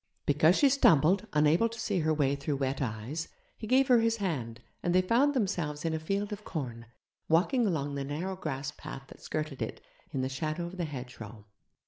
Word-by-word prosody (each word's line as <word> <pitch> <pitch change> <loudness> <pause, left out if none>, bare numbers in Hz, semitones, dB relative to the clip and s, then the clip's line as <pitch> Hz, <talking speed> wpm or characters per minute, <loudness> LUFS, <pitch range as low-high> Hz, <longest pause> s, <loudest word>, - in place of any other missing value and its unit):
Because 155 +4 +4
she 285 - +6
stumbled, 195 - +4
unable 155 +9 +4
to 230 0 -9
see 200 -4 0
her 160 -1 +1
way 140 -3 +2
through 140 +1 -2
wet 135 0 -1
eyes, 125 +6 -3 0.3
he 220 - -7
gave 260 +3 +4
her 250 -3 +6
his 230 0 +2
hand, 135 - -3 0.2
and 175 0 0
they 185 - +6
found 265 +9 +3
themselves 170 - -1
in 165 - 0
a 160 - -1
field 200 +6 -2
of 210 0 -8
corn, 120 - -5 0.4
walking 210 - +3
along 145 -6 -1
the 140 0 -2
narrow 160 +7 -3
grass 145 -5 -4
path 145 -3 -9
that - - -14
skirted 155 -3 -4
it, - - -3 0.3
in 135 - -2
the 130 - 0
shadow 155 +5 -3
of 175 +2 -8
the 175 - -1
hedgerow. 125 -6 -8
155 Hz, 200 wpm, -30 LUFS, 140-195 Hz, 0.4 s, she